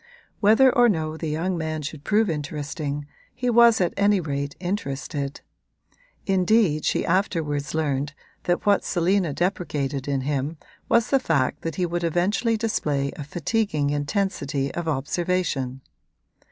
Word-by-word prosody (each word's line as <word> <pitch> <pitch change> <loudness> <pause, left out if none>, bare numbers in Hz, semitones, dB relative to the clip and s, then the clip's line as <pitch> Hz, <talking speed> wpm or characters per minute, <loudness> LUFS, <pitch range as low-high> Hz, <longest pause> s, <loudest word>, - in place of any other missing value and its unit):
Whether 230 +5 +5
or 245 -1 +6
no 160 -5 -1
the 160 0 -4
young 170 +5 -1
man 155 -1 -3
should 145 0 -6
prove 215 +4 +2
interesting 145 -2 -3 0.3
he 250 -1 0
was 235 -1 +6
at 180 -2 +1
any 200 0 +3
rate 140 -3 -3
interested; 145 -6 -3 0.8
indeed 190 -4 +2
she - - +1
afterwards 160 -6 0
learned 145 -2 -1 0.3
that 175 0 0
what 205 -1 +4
Selina 180 -1 +1
deprecated 145 -5 -2
in 140 -2 0
him 145 +3 -2 0.3
was 235 -1 +3
the 275 - +5
fact 140 - 0
that 165 - -4
he 180 - 0
would 175 0 -2
eventually 190 +7 +1
display 150 -11 -1
a 150 - -6
fatiguing 155 -1 -1
intensity 145 -2 -1
of 170 -1 -4
observation. 145 -3 -1
160 Hz, 140 wpm, -24 LUFS, 145-195 Hz, 0.8 s, or